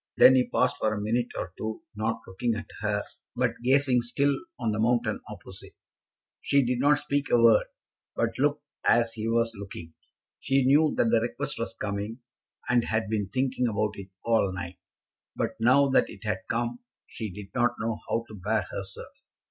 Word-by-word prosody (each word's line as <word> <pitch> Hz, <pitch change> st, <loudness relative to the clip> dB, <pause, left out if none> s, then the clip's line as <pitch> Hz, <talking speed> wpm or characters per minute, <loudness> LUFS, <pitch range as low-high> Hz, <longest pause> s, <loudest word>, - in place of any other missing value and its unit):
Then 130 Hz, -, +9 dB
he 130 Hz, -1 st, +3 dB
paused 125 Hz, -, +1 dB
for 110 Hz, -, +1 dB
a -, -, -3 dB
minute 115 Hz, +4 st, 0 dB
or 90 Hz, +1 st, -4 dB
two, 110 Hz, +8 st, -4 dB
not 110 Hz, +2 st, -1 dB
looking 110 Hz, +5 st, -1 dB
at 115 Hz, -, -5 dB
her, 105 Hz, -1 st, 0 dB, 0.3 s
but -, -, -1 dB
gazing 130 Hz, -1 st, +4 dB
still 140 Hz, +4 st, +1 dB, 0.2 s
on 115 Hz, -3 st, 0 dB
the 110 Hz, -, -2 dB
mountain 115 Hz, -1 st, +1 dB
opposite. -, -, -10 dB, 0.7 s
She 140 Hz, -2 st, +3 dB
did 125 Hz, 0 st, 0 dB
not 145 Hz, +2 st, +4 dB
speak 145 Hz, 0 st, -2 dB
a -, -, +5 dB
word, 115 Hz, -2 st, +5 dB, 0.5 s
but 115 Hz, -1 st, +1 dB
looked 145 Hz, +1 st, +1 dB, 0.2 s
as 115 Hz, 0 st, +3 dB
he 110 Hz, 0 st, -4 dB
was 115 Hz, 0 st, +1 dB
looking. 95 Hz, -5 st, -9 dB, 0.5 s
She 135 Hz, -1 st, +2 dB
knew 150 Hz, +3 st, +5 dB
that 115 Hz, -, +3 dB
the 115 Hz, -1 st, +4 dB
request 120 Hz, -, -3 dB
was -, -, -3 dB
coming, 100 Hz, +3 st, -4 dB, 0.5 s
and 120 Hz, -1 st, +3 dB
had 110 Hz, -1 st, -1 dB
been 105 Hz, -3 st, -1 dB
thinking 130 Hz, +2 st, 0 dB
about 105 Hz, -1 st, 0 dB
it 100 Hz, -2 st, -9 dB, 0.2 s
all 115 Hz, -4 st, +3 dB
night; 90 Hz, -1 st, -6 dB, 0.6 s
but -, -, -1 dB
now 130 Hz, +5 st, +5 dB
that 135 Hz, -, +3 dB
it -, -, -11 dB
had 105 Hz, +1 st, -3 dB
come 120 Hz, +1 st, -1 dB, 0.3 s
she 110 Hz, -2 st, -6 dB
did 100 Hz, +1 st, -10 dB
not 120 Hz, -1 st, +2 dB
know 115 Hz, -1 st, -2 dB
how 115 Hz, 0 st, 0 dB
to -, -, -12 dB
bear 105 Hz, +2 st, -1 dB
herself. 95 Hz, -1 st, -8 dB
115 Hz, 185 wpm, -27 LUFS, 105-125 Hz, 0.7 s, Then